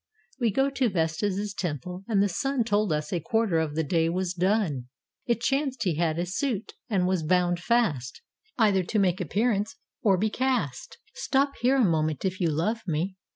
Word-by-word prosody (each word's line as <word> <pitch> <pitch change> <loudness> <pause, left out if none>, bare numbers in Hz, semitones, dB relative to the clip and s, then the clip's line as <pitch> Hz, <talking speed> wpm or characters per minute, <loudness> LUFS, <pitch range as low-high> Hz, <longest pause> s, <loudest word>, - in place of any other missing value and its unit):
We 235 -3 +2
got 270 +6 +1
to 255 -3 +3
Vesta's 195 +4 -1
temple, 180 +1 -4
and 205 -4 +3
the - - +3
sun 270 +7 0
Told 210 -3 +1
us 150 +1 -2
a 175 - +1
quarter 225 -5 +1
of 155 -2 -2
the 160 - +1
day 165 +1 +1
was 180 +1 -1
done. 180 - 0 0.4
It 235 -1 +1
chanced 270 +1 0
he 175 -7 0
had 165 -2 +1
a 175 - 0
suit, 215 +3 -2 0.2
and 190 -5 +2
was 185 -2 +1
bound 175 +2 +2
fast 180 - 0 0.3
Either 205 -5 +4
to 185 +5 -2
make 190 -2 +2
appearance 210 +4 0 0.3
or 195 -4 +4
be 215 +3 0
cast. 180 - -1 0.3
407 270 - +4
ROME 275 - +5
"Stop - - -21
here 255 +3 +4
a 260 -4 +4
moment, 155 0 0
if 185 +1 -1
you 170 - +3
love 175 +10 0
me." 175 +4 -1
190 Hz, 200 wpm, -27 LUFS, 165-225 Hz, 0.4 s, ROME